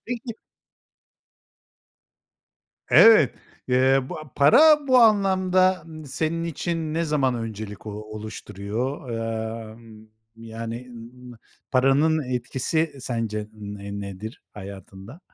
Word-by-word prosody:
Peki 235 -1 -5 2.6
Evet, 215 - +7 0.3
eee, 130 +2 +4
bu, - - -6
a 155 -4 -12
para 295 - +6
bu 255 -1 +6
anlamda, 185 -4 +3
n 155 -1 -10
senin 160 +4 -2
için 165 -1 -3
ne 170 +1 0
zaman 140 -5 +1
öncelik, 110 -2 -6
o - - -4
oluşturuyor? 110 +4 -6
Emm, 110 -1 -6 0.3
yani, 115 +2 -7
ııı, 120 - -11
ımm, 125 +1 -12 0.4
paranın 140 +4 +3
etkisi 130 +6 -2
sence, 110 -4 -3
ne 100 -1 -7
nedir 100 +3 -8
hayatında? 100 - -11
125 Hz, 100 wpm, -24 LUFS, 110-160 Hz, 2.6 s, Evet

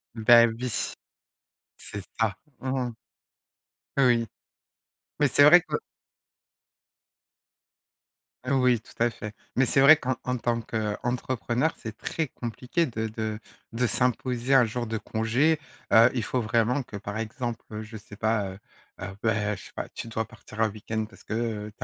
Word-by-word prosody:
Bah 115 +1 +7
oui, 120 +3 -4 1.1
c'est 100 - -7 0.2
ça. 110 -4 +2 0.2
Mmh 130 -2 -1
mh. - - -7 1.1
Oui, 120 -4 +4 0.9
mais 145 - +5
c'est 145 - +5
vrai 160 +5 +9
que 175 - -3 2.7
Oui 125 -3 +3
tout - - -18
à 120 - +3
fait. 105 -1 -8 0.2
Mais 135 +1 +4
c'est 135 +3 +3
vrai 150 +3 +9
qu'en 130 -4 -1
en 125 0 -1
tant 120 0 0
qu'entrepreneur, 120 +5 -1
c'est 110 -1 -8
très 160 -2 -2
compliqué 125 +8 -2
de 115 -5 -3
de 110 -1 -4 0.3
de 120 +1 +1
s'imposer 125 +1 0
un 135 -2 +7
jour 120 +1 -3
de 110 - -2
congé. 120 +10 +1 0.3
Heu, 115 +1 +8
il 120 -4 -1
faut 130 - -1
vraiment 115 +4 +1
que 110 - -11
par 100 +1 -5
exemple, 115 +1 -4
heu, 105 0 -5
je 110 0 -8
sais 105 0 -12
pas, 110 -3 0
heu, 95 - -10 0.4
heu, 90 - -3 0.2
bah 105 -2 +1
je - - -11
sais - - -13
pas - - -5
tu - - -7
dois 110 0 -2
partir 110 +1 -9
un 110 - +4
week-end. 110 +1 -4
Parce - - -17
que 110 -2 -3
tu - - -6
115 Hz, 160 wpm, -27 LUFS, 110-125 Hz, 2.7 s, vrai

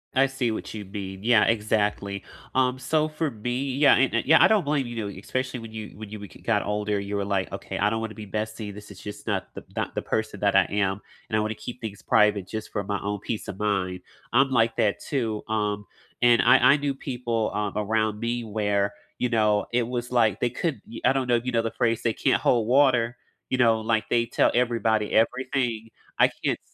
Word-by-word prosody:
I 135 +1 +5
see 130 -3 -1
what 110 - -5
you 105 -2 -6
mean, 95 -1 -7
yeah, 115 -2 +5
exactly. 105 -2 0 0.3
Um, 130 0 +2
so 155 +3 +1
for 155 0 -2
me 125 +3 -3
yeah, 145 +1 +6
and 130 -1 +2
a 115 - +1
yeah, 160 - +7
I - - +8
don't 215 -4 +3
blame, 145 -3 0
you 120 - -7
know, 110 -3 -3
especially 130 +4 -3
when 115 -1 -9
you 110 -1 -7
when 110 -1 -8
you 110 - -7
bec 100 -2 -11
got 110 -3 +1
older, 105 0 -1
you 100 +1 -4
were 100 - -1
like, 100 -2 -1
"Okay, - - -6
I 105 - +2
don't 110 +1 -1
wanna 110 -1 -5
be 110 - -8
bestie, 110 0 -4
this 105 +1 -11
is 100 -3 -12
just 105 +1 -9
not 95 -3 -1
the - - -8
not - - -2
the - - -1
person - - -2
that - - +2
I - - +7
am, 100 0 0 0.3
and 110 - -1
I - - +3
wanna 110 +1 -1
keep 125 +3 -8
things 105 -3 -6
private 105 -3 +3
just 110 +2 -6
for 105 - -2
my 100 0 -2
own 100 0 -3
peace 110 - -4
of 95 - -7
mind." 95 -3 -1 0.3
I'm 135 +3 +4
like 115 -3 +2
that 100 - +2
too, 115 -7 -2
um, 105 -1 -1 0.4
and 120 -1 +6
I - - +7 0.2
I - - +3
knew 145 -1 -2
people, 120 -5 -2
um, 105 -1 -2
around 110 0 0
me 120 +1 -2
where, 105 -2 0 0.3
you 125 - +1
know, 105 -3 +2
it 120 0 +3
was 120 0 -3
like 110 -5 +3
they 120 - +1
could 145 +5 -3
ye 115 - -9
I 130 - +6
don't 130 -2 -1
know 120 - +3
if 120 +1 -1
you 125 - -1
know 115 -1 +2
the 115 0 -3
phrase, 115 -2 0
"They 115 -2 +1
can't - - +1
hold 115 -3 +2
water," 125 -2 +3 0.3
you 130 - 0
know? 115 -3 +4
Like, 110 0 0
they 115 -1 +2
tell 115 - +2
everybody 115 -3 +1
everything? 120 -1 0 0.3
I - - +5
can't - - 0
110 Hz, 235 wpm, -25 LUFS, 105-125 Hz, 0.4 s, I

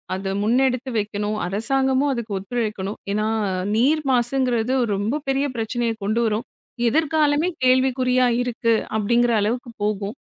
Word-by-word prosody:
அத 195 0 -3
முன்னெடுத்து 255 +2 +1
வைக்கணும், 210 0 -2
அரசாங்கமும் 265 +8 +1
அதுக்கு 235 -4 -5
ஒத்துழைக்கணும், 210 -1 -3
ஏன்னா 215 +1 0 0.5
நீர் 285 +8 +3
மாசுங்கிறது 245 -1 +1 0.2
ரொம்ப 225 +10 -2
பெரிய 270 +1 +1
பிரச்சனையை 230 0 -1
கொண்டு 215 +4 0
வரும், 220 +2 -1 0.4
எதிர்காலமே 310 +3 +2 0.2
கேள்விக்குறியா 255 0 +3
இருக்கு 230 -2 0 0.2
அப்படிங்கிற 235 +3 +2
அளவுக்கு 235 +3 -2
போகும், 210 0 -2
240 Hz, 115 wpm, -22 LUFS, 215-260 Hz, 0.5 s, நீர்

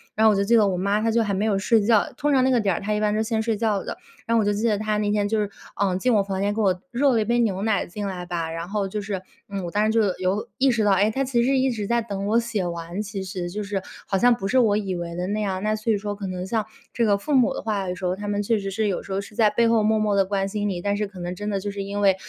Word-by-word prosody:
然 220 - +3
后 220 - +7
我 - - +2
就 200 - +2
记 235 +3 +4
得 215 - +5
我 185 - 0
妈 200 +3 +1
她 225 0 +1
就 235 - +3
还 205 - -1
没 195 +2 0
有 200 -3 +1
睡 220 +2 +3
觉， 215 0 +3
通 295 0 +1
常 265 -2 +4
那 260 - +3
个 245 -3 +3
点 195 -3 +1
儿 - - -2
她 210 +1 -1
一 210 - -1
般 210 -1 +2
是 215 - +1
先 220 -1 -1
睡 225 -2 0
觉 210 -3 0
的， - - -6 0.3
然 230 - 0
后 - - +4
我 215 - +1
就 205 - +2
记 210 +3 -1
得 210 - +2
她 215 0 -1
那 205 -1 0
天 205 -1 +1
就 215 0 +1
是， 205 - -2 0.3
呃， 190 -2 +1
进 250 +5 +1
我 205 -2 +4
房 195 -1 -3
间 205 +1 +1
给 220 - 0
我， 185 -3 +1
热 270 +3 +3
了 230 - +3
一 - - -1
杯 240 +2 +1
牛 200 -5 0
奶 220 -2 +1
进 205 +3 -5
来 180 -2 -5
吧， 170 -2 -3
然 165 +2 -5
后 205 -1 -1
就 210 +2 -4
是， 195 -2 -4 0.3
嗯， 195 -2 -4
我 170 - -5
当 210 +3 +2
时 220 - +2
就 225 - +2 0.2
有 185 +3 -1
意 270 0 +4
识 225 -3 +1
到， 205 - +4
哎， 205 +3 +3
她 270 +4 -1
其 240 -2 +1
实 270 +2 +2
一 265 0 +2
直 215 -4 -3
在 235 0 +2
等 200 -3 -4
我 225 +3 +3
写 230 -5 -2
完， 170 +2 -4
其 205 -2 -5
实 180 -2 -4
就 210 +3 -4
是 200 -1 -3 0.3
好 195 - +1
像 245 +2 +5
不 195 -4 -4
是 260 +5 +3
我 210 -4 +3
以 195 -3 -2
为 170 -1 -5
的 180 +1 -2
那 210 +2 -1
样， 190 -2 -2
那 215 0 +1
所 215 +1 -1
以 210 - +2
说 205 0 -4
可 200 -1 -5
能 185 0 -4
像 220 +1 0 0.3
这 235 - 0
个 200 -1 +3
父 295 +9 -3
母 250 -3 +4
的 - - -4
话， 200 -4 -1
有 180 - -2
时 180 0 -6
候 180 - 0
他 205 +2 -6
们 205 0 -1
确 220 0 +1
实 195 - -4
是 215 +2 0
有 190 - -1
时 195 - -10
候 190 - 0
是 200 - -12
在 215 -2 +4
背 235 +1 +2
后 230 -1 +3
默 220 +1 +3
默 210 -1 +1
地 195 -1 +3
关 195 0 -1
心 205 +1 -2
你， 180 -3 -3
但 200 +1 0
是 210 - -1
可 195 -2 -12
能 175 0 -4
真 205 +2 -4
的 200 -1 -1
就 205 +1 -4
是 200 0 -4
因 200 +1 -3
为 195 -2 +5
205 Hz, 370 characters per minute, -24 LUFS, 195-220 Hz, 0.3 s, 后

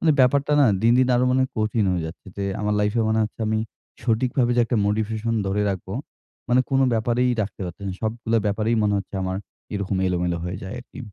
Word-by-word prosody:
মানে 160 - +3
ব্যাপারটা 140 +3 +3
না 135 - +6 0.2
দিন, 115 +1 +5
দিন 130 0 +4
আরো 125 +1 +3
মনে 130 +1 +3
হয় 130 - -1
কঠিন 110 0 +1
হয়ে 85 -2 -1
যাচ্ছে। 85 +5 -10
যে 100 - -2 0.2
আমার 105 0 0
লাইফ-এ 105 +3 +1
মনে 110 0 +2
হচ্ছে 110 - -8
আমি, 110 0 +1 0.4
সঠিকভাবে 120 +1 +1
যে - - +5
একটা 120 0 -1
মোটিভেশন 110 +2 -1
ধরে 100 +2 0
রাখবো 95 +1 -5 0.5
মানে 125 +1 +4
কোন 135 0 +3
ব্যাপারেই 120 +3 +1
রাখতে 100 - -7
পারতেছি 90 +3 -7
না। - - -2
সবগুলা 115 +1 0
ব্যাপারেই 110 +3 +1
মনে 105 -1 +2
হচ্ছে 100 +1 -8
আমার, 95 0 -2 0.4
এরকম 100 -1 -1
এলোমেলো 90 -1 0
হয়ে 90 +2 -3
যায় 95 +4 -6
আরকি। 125 - -14
110 Hz, 210 wpm, -23 LUFS, 100-120 Hz, 0.5 s, না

